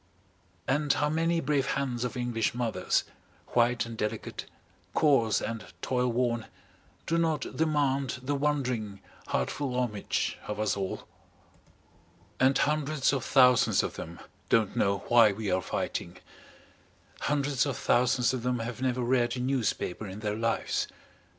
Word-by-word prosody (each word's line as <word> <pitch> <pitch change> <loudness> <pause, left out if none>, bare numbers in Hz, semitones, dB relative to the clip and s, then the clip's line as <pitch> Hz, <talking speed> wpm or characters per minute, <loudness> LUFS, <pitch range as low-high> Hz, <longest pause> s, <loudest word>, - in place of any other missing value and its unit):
And 145 +2 +2
how 150 - +1
many 165 +1 +1
brave 140 -3 +1
hands 130 -3 -2
of 125 +1 -3
English 120 -2 -1
mothers, 115 -7 0 0.5
white 120 0 +2
and 115 0 -7
delicate, 105 -1 -4 0.5
coarse 135 -8 +4
and 115 -2 -4 0.2
toil 125 -1 +1
worn, 120 -1 0 0.6
do 165 0 +1
not 160 -4 -1
demand 140 -4 +1
the 140 +3 -1
wondering, 130 -8 -1 0.3
heart - - 0
full 135 -4 -3
homage 105 -5 -1
of 105 0 -4
us 110 -1 +1
all? 95 -2 -4 1.3
And 130 +1 +4
hundreds 150 -1 +1
of 135 - -1
thousands 125 -3 +5
of - - -3
them 85 +1 -8 0.3
don't 110 -4 +2
know 100 0 +1
why 115 -4 +6
we 105 -1 -3
are 90 +1 +2
fighting. - - -3 1.0
Hundreds 140 -1 +1
of 135 - -2
thousands 125 0 +2
of 130 - -2
them 125 +1 0
have 115 +2 -5
never 125 -1 0
read 120 0 +1
a - - -3
newspaper 125 -6 -1
in 95 +3 -8
their 105 -1 -1
lives. 115 +1 0
125 Hz, 145 wpm, -29 LUFS, 115-140 Hz, 1.3 s, why